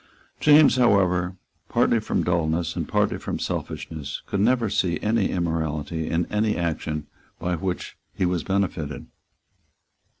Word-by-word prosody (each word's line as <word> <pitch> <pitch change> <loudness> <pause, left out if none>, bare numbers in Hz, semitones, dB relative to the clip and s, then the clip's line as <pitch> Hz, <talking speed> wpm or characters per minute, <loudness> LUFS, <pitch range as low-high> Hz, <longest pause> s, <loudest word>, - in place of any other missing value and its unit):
James, 150 -2 +6
however, 95 -6 +3 0.3
partly - - +3
from - - -1
dulness 85 -1 0
and - - -3
partly - - +1
from - - -3
selfishness, 75 -4 -5
could 100 - -2
never 120 +2 +3
see 90 -5 0
any 110 -1 +1
immorality 80 -2 -2
in 85 +1 +1
any 105 0 +1
action 80 -3 -2 0.3
by 90 +1 -2
which 90 +2 -4
he 95 - -1
was 90 -3 0
benefited. 90 -7 -2
90 Hz, 130 wpm, -24 LUFS, 80-100 Hz, 0.3 s, James